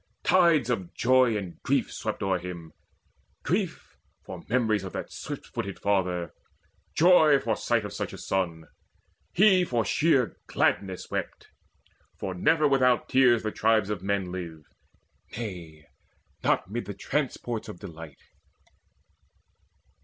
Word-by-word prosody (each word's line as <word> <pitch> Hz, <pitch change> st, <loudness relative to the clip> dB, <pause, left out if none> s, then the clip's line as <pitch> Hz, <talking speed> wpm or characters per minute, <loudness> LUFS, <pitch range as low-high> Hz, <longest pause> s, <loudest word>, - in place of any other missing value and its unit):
Tides 165 Hz, -9 st, +4 dB
of 95 Hz, -7 st, -3 dB
joy 125 Hz, -2 st, +3 dB
And 95 Hz, -4 st, -7 dB
grief -, -, 0 dB
swept -, -, -4 dB
o'er 95 Hz, -2 st, +1 dB
him 85 Hz, -2 st, -8 dB, 0.7 s
grief, -, -, -2 dB, 0.3 s
for -, -, -8 dB
memories 110 Hz, -4 st, +1 dB
Of 95 Hz, -, -7 dB
that -, -, -5 dB
swift -, -, -7 dB
footed 100 Hz, -1 st, -5 dB
father 90 Hz, -4 st, -1 dB, 0.6 s
joy, 160 Hz, -4 st, +6 dB
for 115 Hz, -5 st, -1 dB
sight 115 Hz, 0 st, 0 dB
Of 105 Hz, -, -6 dB
such -, -, -4 dB
a -, -, -9 dB
son. 85 Hz, -4 st, -2 dB, 0.7 s
He 190 Hz, -1 st, +5 dB
for 120 Hz, -9 st, 0 dB
sheer 135 Hz, -, +2 dB
gladness 95 Hz, -3 st, -1 dB
wept; -, -, -5 dB, 0.7 s
For 95 Hz, -2 st, -4 dB
never 155 Hz, -, +3 dB
without 130 Hz, -3 st, +2 dB
tears 125 Hz, -3 st, +4 dB
the 110 Hz, -, -2 dB
tribes 110 Hz, -2 st, +2 dB
of 100 Hz, -4 st, -3 dB
men 100 Hz, -2 st, -1 dB
Live 85 Hz, -4 st, -7 dB, 0.7 s
nay, 85 Hz, -9 st, -7 dB, 0.6 s
not -, -, +1 dB
mid 120 Hz, +2 st, -3 dB
the 100 Hz, -, -6 dB
transports 120 Hz, -2 st, -3 dB
of 105 Hz, -, -8 dB
delight. 80 Hz, -6 st, -11 dB
105 Hz, 130 wpm, -27 LUFS, 90-125 Hz, 0.7 s, joy